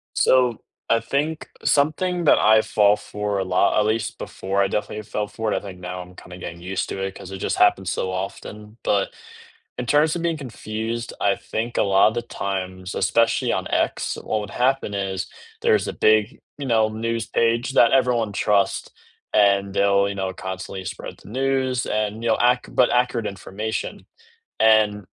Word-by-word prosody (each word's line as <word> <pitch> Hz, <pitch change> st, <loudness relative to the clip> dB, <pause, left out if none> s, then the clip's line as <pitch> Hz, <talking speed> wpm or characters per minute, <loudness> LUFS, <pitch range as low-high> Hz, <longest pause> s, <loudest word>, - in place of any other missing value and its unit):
So, 125 Hz, -3 st, +3 dB, 0.3 s
I 115 Hz, -, +4 dB
think 145 Hz, +7 st, -2 dB, 0.2 s
something 170 Hz, +5 st, +1 dB
that -, -, +6 dB
I 110 Hz, 0 st, +5 dB
fall 105 Hz, -1 st, +3 dB
for 105 Hz, -1 st, -3 dB
a 95 Hz, -, 0 dB
lot, 95 Hz, +2 st, +2 dB
at 105 Hz, -, +3 dB
least 110 Hz, 0 st, -1 dB
before, 95 Hz, +1 st, -3 dB
I 100 Hz, -, +4 dB
definitely 105 Hz, +2 st, -3 dB
fell 105 Hz, 0 st, -3 dB
for 110 Hz, +1 st, -3 dB
it, -, -, +1 dB
I -, -, -1 dB
think 95 Hz, -3 st, -9 dB
now 90 Hz, 0 st, -6 dB
I'm 90 Hz, 0 st, -11 dB
kinda 90 Hz, 0 st, -11 dB
getting 85 Hz, -1 st, -8 dB
used 90 Hz, +2 st, -3 dB
to -, -, -5 dB
it, 95 Hz, 0 st, -3 dB
'cause 95 Hz, -, -10 dB
it 95 Hz, -, -6 dB
just -, -, -2 dB
happens 95 Hz, -3 st, +3 dB
so 95 Hz, -, -2 dB
often, 105 Hz, +3 st, -6 dB
but 100 Hz, -1 st, +1 dB, 0.7 s
in 125 Hz, -, -3 dB
terms 150 Hz, +5 st, +3 dB
of 170 Hz, -, -3 dB
being 165 Hz, -2 st, 0 dB
confused, 115 Hz, -2 st, -5 dB
I 100 Hz, -1 st, +3 dB
think 115 Hz, +2 st, -4 dB
a -, -, +4 dB
lot 100 Hz, +2 st, +4 dB
the 120 Hz, -, 0 dB
times, 95 Hz, -4 st, -4 dB
especially 115 Hz, 0 st, +2 dB
on -, -, -1 dB
X, -, -, -1 dB
what 110 Hz, -, -1 dB
would 105 Hz, -1 st, -6 dB
happen 130 Hz, -4 st, 0 dB
is, 95 Hz, -2 st, -2 dB, 0.3 s
there's -, -, +2 dB
a -, -, -3 dB
big, 110 Hz, +2 st, +2 dB, 0.2 s
you 145 Hz, -, -5 dB
know, 110 Hz, -3 st, +3 dB
news 115 Hz, +1 st, -3 dB
page 115 Hz, +2 st, +1 dB
that 120 Hz, -3 st, +5 dB
everyone 120 Hz, -5 st, +2 dB
trust, 100 Hz, 0 st, +1 dB, 0.4 s
and 100 Hz, -1 st, +3 dB
they'll, 100 Hz, 0 st, +3 dB
you 100 Hz, -, -4 dB
know, 95 Hz, -1 st, -3 dB
constantly 95 Hz, +1 st, -6 dB
spread -, -, -7 dB
the -, -, -14 dB
news, 130 Hz, 0 st, 0 dB
and 110 Hz, +1 st, -2 dB
you 115 Hz, -, 0 dB
know, 110 Hz, -, +3 dB
ac 125 Hz, +1 st, +4 dB
but 125 Hz, -, +4 dB
accurate 125 Hz, -2 st, +1 dB
information. 100 Hz, +3 st, -5 dB, 0.5 s
And 105 Hz, -3 st, +4 dB
105 Hz, 185 wpm, -23 LUFS, 100-120 Hz, 0.7 s, that